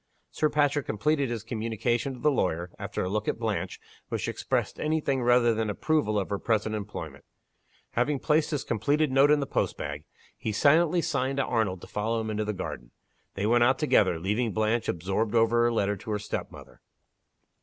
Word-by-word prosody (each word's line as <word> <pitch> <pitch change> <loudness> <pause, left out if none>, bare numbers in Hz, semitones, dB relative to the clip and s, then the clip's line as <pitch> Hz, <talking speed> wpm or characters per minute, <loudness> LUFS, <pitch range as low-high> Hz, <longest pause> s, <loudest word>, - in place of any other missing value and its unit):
Sir 155 - +1
Patrick 145 -1 +1
completed 140 +5 +1
his 115 -3 -4
communication 115 +3 -2
to - - -12
the 150 - +4
lawyer 90 - -1
after - - -3
a - - -2
look 105 +3 -2
at - - 0
Blanche, 100 -6 -3 0.3
which - - -2
expressed - - -2
any 155 +1 +1
thing 135 -3 0
rather 120 -1 +4
than 110 -1 -1
approval 110 -1 0
of 100 -1 -2
her 100 - -1
present 110 -1 0
employment. 105 -1 -6 0.7
Having 140 +5 +1
placed 150 +2 +1
his 150 -4 -2
completed 145 +7 +1
note 135 +2 +5
in 150 -1 +4
the - - -1
postbag, 75 - -2 0.3
he 110 - -3
silently 160 - +3
signed 135 -3 -1
to 140 - +1
Arnold 105 -7 0
to - - -10
follow 110 +2 -1
him 110 -1 -3
into 105 0 -1
the 105 - -1
garden. 90 - -6 0.5
They 100 - -1
went 120 +2 +4
out 130 +2 +4
together, 105 - +3
leaving 105 +6 -1
Blanche 110 +2 0
absorbed 95 +6 -1
over 115 +1 +4
her 120 - +3
letter 105 -3 +1
to 100 - -10
her 105 - 0
step 105 0 -4
mother. - - -14
115 Hz, 195 wpm, -27 LUFS, 105-140 Hz, 0.7 s, note